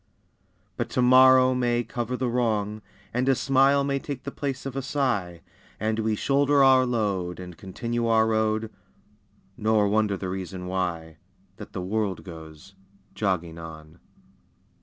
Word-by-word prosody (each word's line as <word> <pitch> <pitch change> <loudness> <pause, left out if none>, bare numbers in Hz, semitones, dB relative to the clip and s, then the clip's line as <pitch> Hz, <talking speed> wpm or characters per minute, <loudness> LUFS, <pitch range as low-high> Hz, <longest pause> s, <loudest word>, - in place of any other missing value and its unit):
But - - -2
tomorrow 130 +1 +6
may 120 -1 +1
cover 120 +2 -4
the 130 - -1
wrong, 110 -3 -1 0.3
And 125 +2 +1
a 135 - +4
smile 135 +2 +3
take 135 -2 -6
the 140 - -5
place 135 -2 -4
of 135 -1 -5
a 135 - -1
sigh, 120 - -2 0.4
And 110 +1 -1
we 110 -1 0
shoulder 140 +4 +3
our 130 -1 +5
load 100 -7 -1
And 90 -1 -9
continue 115 +6 -3
our 110 -1 +4
road, 110 0 0 0.9
Nor 110 -1 +2
wonder 105 -1 +1
the 95 0 -5
reason 95 -1 -5
why, 85 -3 -3 0.4
That - - -11
the 90 - -4
world 100 0 -2
goes 80 0 -12 0.4
"jogging 85 -5 -2
on." 80 0 -11
110 Hz, 140 wpm, -25 LUFS, 95-130 Hz, 0.9 s, tomorrow